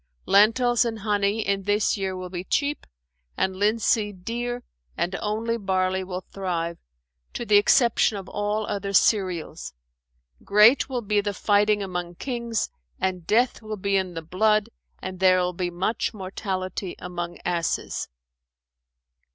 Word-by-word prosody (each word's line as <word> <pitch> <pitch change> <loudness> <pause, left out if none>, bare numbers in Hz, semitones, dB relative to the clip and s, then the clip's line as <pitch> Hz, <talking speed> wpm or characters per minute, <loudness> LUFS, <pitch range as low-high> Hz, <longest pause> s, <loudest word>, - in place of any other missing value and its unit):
Lentils 230 +5 +4
and 230 -2 -2
honey 205 0 0
in 200 0 +1
this 205 +2 +1
year 190 -2 -3
will 180 -1 -7
be 180 -1 -4
cheap 285 +9 -1 0.5
and 190 0 0
linseed 205 -2 +1
dear 240 +2 -3 0.3
and 185 +2 -1
only 225 +2 -1
barley 190 -1 0
will 185 0 -6
thrive, 170 -3 -2 0.5
to 240 - -4
the 210 -2 +5
exception 225 0 +4
of 190 -1 -7
all 210 +2 -1
other 200 -1 -3
cereals: 180 - +1 0.7
great 215 +7 +5
will 250 -3 -2
be 210 0 +2
the 205 -1 -3
fighting 205 +1 +2
among 175 -2 -4
kings 235 -1 -2 0.3
and 185 -3 -2
death 240 +3 +2
will 215 -1 -5
be 200 +1 0
in 185 -2 0
the 165 - -5
blood 215 +6 +2 0.3
and 185 -1 -5
there 185 -1 +5
will 180 0 0
be 180 0 -2
much 185 +6 -2
mortality 185 -1 -4
among 175 -1 -5
asses." 170 -2 -1
200 Hz, 145 wpm, -25 LUFS, 185-215 Hz, 0.7 s, the